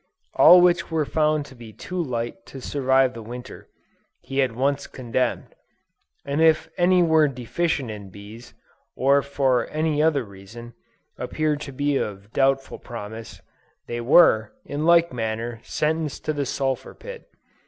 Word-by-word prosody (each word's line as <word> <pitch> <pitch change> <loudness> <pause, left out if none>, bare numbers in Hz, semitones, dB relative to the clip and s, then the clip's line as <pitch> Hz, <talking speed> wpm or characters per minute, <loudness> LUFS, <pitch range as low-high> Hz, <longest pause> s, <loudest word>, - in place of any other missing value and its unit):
All 180 0 +8
which 175 -1 +3
were 160 -2 0
found 155 0 +1
to 135 - -14
be 115 -3 -12
too 180 - -5
light 120 -5 -4
to 135 - -9
survive 130 -1 +1
the 115 - -8
Winter, 120 +3 -10 0.5
he 135 0 -1
at 130 -2 +1
once 140 +4 -1
condemned; 125 0 -3 0.7
and 140 +3 -1
if 160 -1 +3
any 180 0 +4
were 160 -2 +4
deficient 135 +1 -2
in 100 -2 -9
bees, 105 +5 -13 0.4
or 140 +2 +3
for 135 -3 0
any 155 -1 0
other 155 -4 +2
reason, 110 +4 -12 0.5
appeared 155 -1 -1
to 140 - -7
be 145 +1 0
of 100 -1 -5
doubtful 135 0 +1
promise, 110 -1 -9 0.4
they 120 0 -4
were, 115 -5 +5
in 150 +3 -3
like 170 -3 +4
manner, 115 0 -3
sentenced 155 +1 -2
to 155 - 0
the 145 -2 -2
sulphur 135 0 -3
pit. - - -11
135 Hz, 150 wpm, -23 LUFS, 115-155 Hz, 0.7 s, All